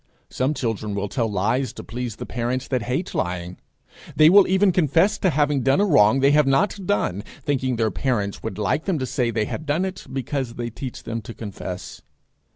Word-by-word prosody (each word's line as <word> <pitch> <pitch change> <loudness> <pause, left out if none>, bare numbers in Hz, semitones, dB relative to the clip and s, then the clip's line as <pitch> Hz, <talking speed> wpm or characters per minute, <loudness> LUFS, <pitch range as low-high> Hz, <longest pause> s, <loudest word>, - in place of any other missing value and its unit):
Some 135 +4 0
children 110 -5 -2
will 100 0 -2
tell 115 0 -1
lies 110 +6 0
to - - -9
please 120 -2 -5
the - - -7
parents 120 +2 -2
that 130 -3 0
hate 125 +10 -2
lying. 90 0 -3 0.6
They 155 +1 +7
will 200 0 +7
even 190 +1 +4
confess 175 +4 +2
to 190 - +2
having 145 -3 +1
done 135 +5 +3
a 205 - +4
wrong 130 - +4
they 140 +1 +5
have 150 -1 +4
not 190 +7 +1
done, 100 - 0 0.2
thinking 130 -4 0
their 110 -2 +1
parents 105 -7 -1
would 95 - -5
like 105 +9 0
them 190 -5 0
to 130 - -2
say 125 -1 0
they 110 -2 0
had 155 - -6
done 160 +6 +1
it, 190 -1 -6
because 130 -2 -3
they 120 -1 -4
teach 125 +2 -7
them 115 0 -4
to 110 +2 -9
confess. 95 -4 -7
130 Hz, 205 wpm, -23 LUFS, 110-150 Hz, 0.6 s, They